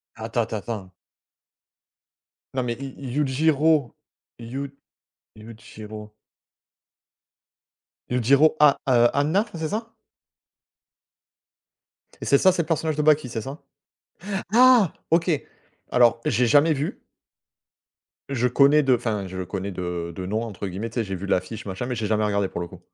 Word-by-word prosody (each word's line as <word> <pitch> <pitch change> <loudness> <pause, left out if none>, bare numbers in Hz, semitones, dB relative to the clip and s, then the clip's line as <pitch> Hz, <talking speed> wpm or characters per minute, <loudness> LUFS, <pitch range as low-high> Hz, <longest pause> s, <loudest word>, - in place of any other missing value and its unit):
Attends, 115 +1 -2
tends, 110 -3 -4
tends 100 -6 -6 1.6
non 130 - +1
mais 120 -1 -2
i 140 - -6
i 130 -3 -6
Yujiro 150 0 +2 0.4
Yud 135 +4 -6 0.6
Yujiro 110 -1 -11 2.0
Yujiro 135 +6 +4
Ha, 150 -2 +6
heu, 120 -2 +5
Hanma 155 - +1
c'est 160 -1 -3
ça 225 +2 -4 2.3
et - - -5
c'est - - +4
ça 190 - +5
c'est 180 -1 0
le - - -14
personnage 160 -2 -1
de 150 - 0
Baki 150 -3 +3
c'est 115 -1 -4
ça? 135 +7 -8 0.9
Ah 245 -6 +6 0.2
OK! 165 +2 +3 0.6
Alors 120 -1 +4
j'ai 120 +1 +2
jamais 150 +4 +4
vu 145 +2 -4 1.3
je 125 -2 +1
connais 140 +4 +4
de, 130 -2 +4
enfin 110 -5 -3
je 95 0 -5
connais 95 +2 -5
de 85 -2 -4
de 90 - -5
«nom» 110 +4 -2
entre 100 -3 -6
guillemets, 95 +5 -5
tu 115 - -17
sais - - +1
j'ai 95 -2 -5
vu 95 +2 -6
l'affiche 100 +3 -2
machin 95 +4 -4
mais 125 - -3
j'ai 110 -2 -2
jamais 110 0 +1
regardé 100 -2 0
pour 85 - -6
le 85 - -4
coup. - - -13
120 Hz, 145 wpm, -24 LUFS, 105-150 Hz, 2.3 s, Ha